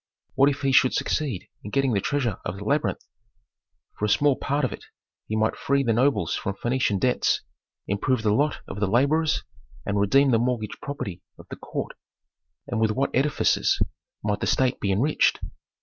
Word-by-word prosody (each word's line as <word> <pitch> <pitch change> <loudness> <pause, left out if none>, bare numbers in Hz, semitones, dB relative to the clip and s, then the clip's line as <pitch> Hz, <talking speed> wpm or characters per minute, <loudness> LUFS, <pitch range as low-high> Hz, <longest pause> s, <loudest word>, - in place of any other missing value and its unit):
What 140 +1 +5
if 145 0 -3
he 135 - +2
should 130 0 +4
succeed 135 -12 -1 0.2
in 105 - -6
getting 135 +1 +1
the 100 - +1
treasure 130 -7 -1
of 90 +2 -4
the 100 - -7
labyrinth! 145 +7 0 0.9
For 105 - 0
a - - 0
small 145 +5 +3
part 140 +2 -1
of - - -3
it - - -10 0.4
he 110 - -2
might 110 0 +1
free 140 0 +1
the 115 -3 +2
nobles 130 +5 +2
from 100 - -3
Phœnician 120 -3 0
debts, 125 +3 +1 0.4
improve 110 +4 0
the 105 -1 +3
lot 145 +7 +1
of 100 - -6
the 105 - +1
laborers 140 +9 +2 0.4
and 100 0 0
redeem 135 +7 +4
the 115 - +4
mortgaged 120 -3 -2
property 100 -11 -5 0.2
of - - -13
the - - -4
court. - - -5 0.7
And 115 - -3
with 110 - +3
what 130 +6 0
edifices 140 +3 +2 0.4
might 105 -1 0
the - - -2
state 130 -1 +1
be 100 - 0
enriched! 130 +11 +2
125 Hz, 185 wpm, -25 LUFS, 105-140 Hz, 0.9 s, What